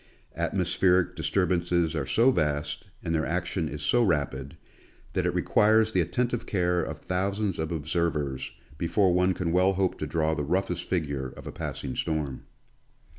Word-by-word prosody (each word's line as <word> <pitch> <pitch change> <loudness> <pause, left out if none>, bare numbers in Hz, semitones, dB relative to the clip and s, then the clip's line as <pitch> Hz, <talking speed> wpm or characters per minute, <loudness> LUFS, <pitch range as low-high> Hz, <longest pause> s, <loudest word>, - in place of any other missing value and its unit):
Atmospheric 90 +1 +2
disturb 90 +3 0
ances 85 -2 +1
are 75 -5 -2
so 120 - +4
vast, 75 - -1 0.2
and 85 - -2
their 80 -1 +1
action 85 -1 -1
is 75 - -6
so 120 - +3
rapid, 70 - -1 0.6
that - - +1
it - - 0
requires 110 +1 +4
the 95 - +2
attentive 120 +7 -1
care 90 -2 +1
of - - -4
thousands 100 +1 -1
of 80 +1 -2
observers 75 -5 -1 0.3
before 90 +2 +2
one 90 +1 +3
can 85 -2 -1
well 90 +2 +4
hope 95 -1 0
to - - -2
draw 80 -1 +1
the 80 - -2
roughest 90 +2 -1
figure 70 -7 -1
of - - -12
a - - -5
passing 65 -2 -5
storm. 75 -5 -2
85 Hz, 165 wpm, -27 LUFS, 75-95 Hz, 0.6 s, so